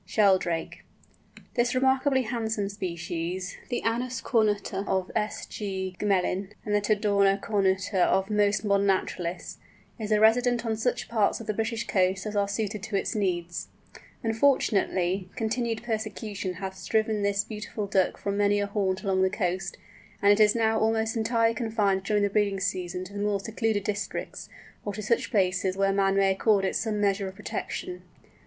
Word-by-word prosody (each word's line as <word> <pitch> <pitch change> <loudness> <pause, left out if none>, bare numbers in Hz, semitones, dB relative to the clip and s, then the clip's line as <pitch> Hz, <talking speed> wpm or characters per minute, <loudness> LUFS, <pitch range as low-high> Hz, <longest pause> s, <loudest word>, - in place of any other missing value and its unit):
SHELDRAKE. 185 -4 +1 0.7
This 240 0 +1
remarkably 265 +1 +3
handsome 220 -3 -2
species, 175 -1 -4
the 245 - -2
Anas 245 +3 -1
cornuta 205 -4 0
of 190 -1 -1
S. 210 0 -1
G. 190 -3 -4
Gmelin, 195 0 0
and 210 - -1
the 205 - +3
Tadorna 200 -1 +2
cornuta 195 -2 +1
of 190 +2 +1
most 210 0 +2
modern 200 -1 +2
naturalists, 180 -2 -2 0.4
is 215 -1 -4
a 210 - +4
resident 240 +2 +4
on 225 -1 0
such 235 +3 -1
parts 215 -3 +1
of 230 - -8
the 215 - -1
British 225 +1 -2
coasts 190 +1 +1
as 210 0 -4
are 200 -1 +2
suited 210 0 -3
to 215 0 -4
its 195 - 0
needs. 175 -5 -2 0.6
Unfortunately, 200 -6 +1
continued 225 -1 -1
persecution 215 -4 -3
has 190 +1 -6
driven 220 -1 +1
this 200 0 +1
beautiful 210 -1 -5
Duck 195 -2 +1
from 200 0 -2
many 205 0 +3
a 205 - +1
haunt 200 -1 -1
along 190 -2 +1
the 190 - +4
coast, 185 -1 -2 0.4
and 200 - +5
it 205 - 0
is 210 0 +5
now 220 -1 +2
almost 220 +1 +1
entirely 230 0 +2
confined 220 -4 0
during 210 0 +1
the 200 - +2
breeding 200 -2 +1
season 180 -1 -2
to 185 +2 -10
the 205 - -5
more 205 -1 0
secluded 220 0 -1
districts, 205 0 -4 0.3
or 205 - -3
to 215 - -5
such 230 +3 +1
places 190 -2 +1
where 195 0 +2
man 195 0 +2
may 195 -1 +4
accord 195 0 +2
it - - -1
some 215 -3 -1
measure 200 -1 +1
of 190 - -8
protection. 360 - -5
205 Hz, 170 wpm, -27 LUFS, 195-220 Hz, 0.7 s, and